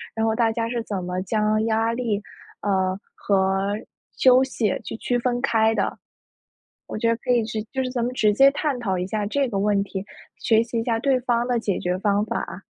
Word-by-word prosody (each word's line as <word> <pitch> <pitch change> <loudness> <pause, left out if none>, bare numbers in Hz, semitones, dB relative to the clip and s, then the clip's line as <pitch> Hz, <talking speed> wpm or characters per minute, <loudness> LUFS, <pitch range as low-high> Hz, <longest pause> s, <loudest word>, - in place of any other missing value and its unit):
然 225 0 0
后 220 - +2
大 225 -1 +2
家 230 0 -2
是 235 0 -2
怎 200 -5 -4
么 180 +1 -3
将 215 +2 +1
压 225 0 +1
力， 230 -4 -1 0.4
呃， 190 -1 0
和 195 +1 +1 0.4
休 255 0 +6
息 230 -6 -1
去 - - -6
区 245 +1 -1
分 245 0 0
开 225 -3 +2
的。 - - -1 0.9
我 - - -6
觉 230 +2 0
得 230 - +3
可 250 +2 -2
以 240 -2 +3
是 215 -1 -3
就 265 - -1
是 255 - -2
咱 250 -2 -2
们 250 - -3
直 215 -4 +3
接 275 +6 +6
探 290 -1 -1
讨 190 -6 -1
一 180 - -2
下 210 +1 -2
这 275 +6 0
个 205 -5 -2
问 205 0 +2
题， 195 -1 -5 0.3
学 225 -1 +3
习 235 0 -4
一 - - -3
下 230 -1 0
对 265 +2 +2
方 240 -1 0
的 245 -1 +1
解 210 -4 -1
决 180 +1 -1
方 205 +1 +1
法。 - - -4
225 Hz, 235 characters per minute, -23 LUFS, 200-245 Hz, 0.9 s, 休